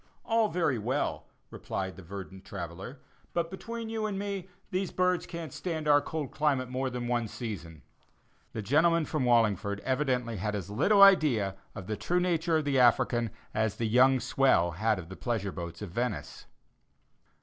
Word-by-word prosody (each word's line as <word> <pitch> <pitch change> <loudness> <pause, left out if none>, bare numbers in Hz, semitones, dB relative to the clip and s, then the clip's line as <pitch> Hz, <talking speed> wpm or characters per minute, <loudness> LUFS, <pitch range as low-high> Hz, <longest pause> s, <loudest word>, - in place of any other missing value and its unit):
"All 225 -2 +2
very 165 - 0
well," 130 +7 -2 0.2
replied 95 -1 -4
the 95 - -11
verdant 95 +1 -9
traveller, 95 - -7 0.3
"but 170 -1 -1
between 230 +4 -6
you 220 -1 -2
and 200 -2 -3
me, 195 -2 -4 0.2
these 185 -1 -1
birds 180 -1 +1
can't 170 -2 -6
stand 160 -4 -3
our 145 -1 +6
cold 155 -3 -4
climate 140 -5 0
more 130 +1 -1
than 125 -1 -4
one 120 -2 0
season." 85 - -7 0.7
The 110 - -4
gentleman 160 - +3
from 150 -5 -1
Wallingford 105 -4 +2
evidently 125 -4 0
had 105 +3 -2
as 100 -1 -5
little 200 - +5
idea 135 - +5 0.2
of 95 - -7
the 110 +2 -3
true 175 - 0
nature 170 -2 +1
of 155 - -2
the 140 -2 +2
African 120 -1 +3 0.2
as 110 -1 0
the 115 - -2
young 130 +4 +5
swell 120 -8 +3
had 110 +5 +1
of 85 -3 -7
the 95 - -9
pleasure 110 -5 -2
boats 85 +1 -7
of 100 - -7
Venice. 120 +6 -4
125 Hz, 170 wpm, -29 LUFS, 105-165 Hz, 0.7 s, our